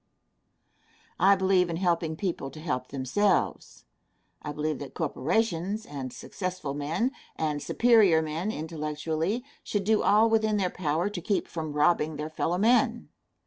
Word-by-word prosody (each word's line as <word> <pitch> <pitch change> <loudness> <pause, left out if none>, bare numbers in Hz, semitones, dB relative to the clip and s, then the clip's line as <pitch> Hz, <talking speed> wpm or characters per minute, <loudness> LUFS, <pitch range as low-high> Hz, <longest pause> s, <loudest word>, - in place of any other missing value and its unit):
I 195 +3 +6
believe 190 -2 +2
in 165 - -2
helping 170 -2 0
people 165 -6 -3
to 155 - -11
help 130 -6 -3
themselves. 140 +10 0 0.6
I 150 - -5
believe 150 -1 -2
that 140 - -8
corporations, 195 - -1
and 135 -3 -6
successful 185 -5 -5
men, 155 - -1 0.2
and 150 -2 -1
superior 215 -9 +4
men 160 +6 -3
intellectually, 160 - -3 0.2
should 205 -2 -1
do 215 +1 +3
all 215 +2 +5
within 220 -1 +2
their 185 -3 0
power 165 +1 -1
to 190 -4 -5
keep 200 +3 -1
from 155 -3 -5
robbing 150 +1 +2
their 150 +1 -5
fellow 170 +2 -1
men. 235 +3 +2
170 Hz, 145 wpm, -27 LUFS, 150-205 Hz, 0.6 s, I